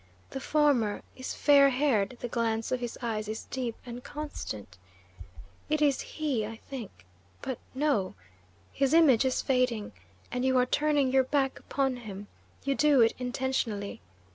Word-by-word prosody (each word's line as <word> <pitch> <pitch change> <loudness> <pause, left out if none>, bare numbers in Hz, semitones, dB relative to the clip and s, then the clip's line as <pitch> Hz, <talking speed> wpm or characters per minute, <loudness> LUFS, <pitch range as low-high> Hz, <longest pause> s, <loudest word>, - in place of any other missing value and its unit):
The 270 - -4
former 270 -7 +2
is 260 - -5
fair 280 -1 +6
haired; 250 -5 +1
the - - -2
glance 225 -1 -1
of 255 - +1
his 240 -1 -5
eyes 215 -2 -2
is 220 +1 -5
deep 245 -3 -3
and 245 0 -7
constant. 200 - -7 0.9
It 305 0 +2
is 285 -3 +3
he, 290 -8 -2
I 220 +2 -5
think 220 - -9 0.4
But 260 -3 -3 0.2
no! 265 -10 +1 0.6
His 275 +2 +2
image 275 -7 +6
is 260 - 0
fading, 250 -5 +1 0.4
and 250 +1 -1
you 260 0 +3
are 250 - +4
turning 290 0 +2
your 265 0 +4
back 270 -1 0
upon 270 -2 -1
him. 205 -4 -8 0.4
You 275 - +1
do 290 -2 +4
it 225 - +5
intentionally. 250 - -2
255 Hz, 155 wpm, -29 LUFS, 225-275 Hz, 0.9 s, fair